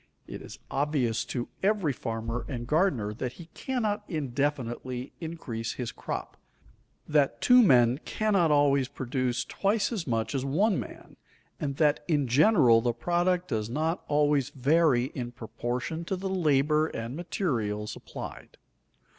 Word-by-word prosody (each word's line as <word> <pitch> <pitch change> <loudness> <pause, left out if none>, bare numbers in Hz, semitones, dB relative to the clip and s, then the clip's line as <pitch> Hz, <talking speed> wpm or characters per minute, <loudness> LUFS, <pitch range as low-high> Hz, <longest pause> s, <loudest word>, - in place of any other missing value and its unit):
It - - -8
is - - -10
obvious 135 -5 0
to 120 -2 -3
every 195 -7 +2
farmer 115 0 -4
and 120 -3 -4
gardener 135 - +1
that 125 +3 -4
he 165 +4 -12
cannot 215 -5 -2
indefinitely 130 -4 -2
increase 125 -9 -4
his 120 -3 -4
crop, - - -6 0.7
that 140 -6 +2
two 250 0 +7
men 125 - +5
cannot 200 -3 +1
always 140 -3 +3
produce 130 -2 -2
twice 205 +2 0
as 205 -10 -3
much 115 0 -1
as 135 -2 -1
one 180 +9 +2
man, - - -9 0.4
and 140 -2 -2
that 150 0 +2
in 145 -5 +1
general 125 - +5
the 120 0 0
product 175 +7 0
does 110 0 -2
not 160 +7 -1
always 145 -2 +2
vary 140 -1 +3
in 120 -2 -5
proportion 125 +7 -4
to 190 - -1
the 190 +1 -4
labor 155 -3 +2
and 115 -2 -5
materials 115 - -2
applied. - - -9
140 Hz, 140 wpm, -28 LUFS, 120-170 Hz, 0.7 s, two